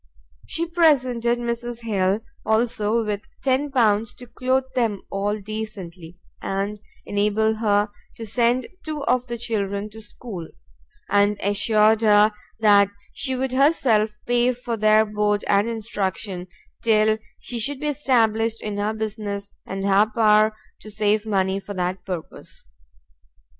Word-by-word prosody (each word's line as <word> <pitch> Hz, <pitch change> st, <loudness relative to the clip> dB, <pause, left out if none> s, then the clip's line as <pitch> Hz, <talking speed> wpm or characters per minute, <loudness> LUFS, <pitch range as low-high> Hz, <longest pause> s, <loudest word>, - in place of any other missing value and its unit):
She 335 Hz, -, -2 dB
presented 255 Hz, -8 st, +2 dB
Mrs 240 Hz, 0 st, -4 dB
Hill, 200 Hz, -2 st, 0 dB, 0.2 s
also, 220 Hz, 0 st, +1 dB
with 205 Hz, -1 st, -2 dB, 0.2 s
10 275 Hz, +2 st, +1 dB
pounds 225 Hz, -5 st, +2 dB
to 250 Hz, -, -11 dB
clothe 255 Hz, +2 st, 0 dB
them 225 Hz, -6 st, 0 dB
all 205 Hz, +2 st, -1 dB
decently, 195 Hz, -5 st, -7 dB, 0.2 s
and 200 Hz, +2 st, -2 dB, 0.3 s
enable 210 Hz, +2 st, +1 dB
her 210 Hz, -1 st, +2 dB, 0.3 s
to 225 Hz, -, -7 dB
send 240 Hz, +3 st, +2 dB, 0.2 s
two 305 Hz, -2 st, -4 dB
of 250 Hz, -1 st, +1 dB
the 240 Hz, 0 st, -4 dB
children 205 Hz, -3 st, -2 dB
to 220 Hz, +1 st, -11 dB
school; 210 Hz, -5 st, -8 dB, 0.6 s
and 205 Hz, +1 st, +3 dB
assured 215 Hz, +2 st, +3 dB
her 210 Hz, -1 st, +5 dB, 0.3 s
that 200 Hz, -2 st, +6 dB, 0.2 s
she 265 Hz, -2 st, -1 dB
would 260 Hz, 0 st, -1 dB
herself 250 Hz, -6 st, +2 dB
pay 245 Hz, +1 st, +2 dB
for 240 Hz, -1 st, -4 dB
their 215 Hz, 0 st, +4 dB
board 210 Hz, -1 st, 0 dB
and 205 Hz, +3 st, +3 dB
instruction, 200 Hz, -4 st, -3 dB, 0.3 s
till 220 Hz, -1 st, +3 dB, 0.2 s
she 240 Hz, -, -4 dB
should 275 Hz, +4 st, 0 dB
be 300 Hz, -, -5 dB
established 230 Hz, -5 st, +1 dB
in 210 Hz, -1 st, -4 dB
her 210 Hz, +2 st, -1 dB
business, 205 Hz, -2 st, -4 dB, 0.2 s
and 195 Hz, 0 st, -4 dB
have 205 Hz, +2 st, +3 dB
power 215 Hz, -1 st, +4 dB, 0.2 s
to 215 Hz, -, -10 dB
save 210 Hz, +1 st, +1 dB
money 190 Hz, -2 st, +1 dB
for 200 Hz, +1 st, -8 dB
that 180 Hz, 0 st, -2 dB
purpose. 180 Hz, -5 st, -8 dB
215 Hz, 135 wpm, -23 LUFS, 205-235 Hz, 0.6 s, that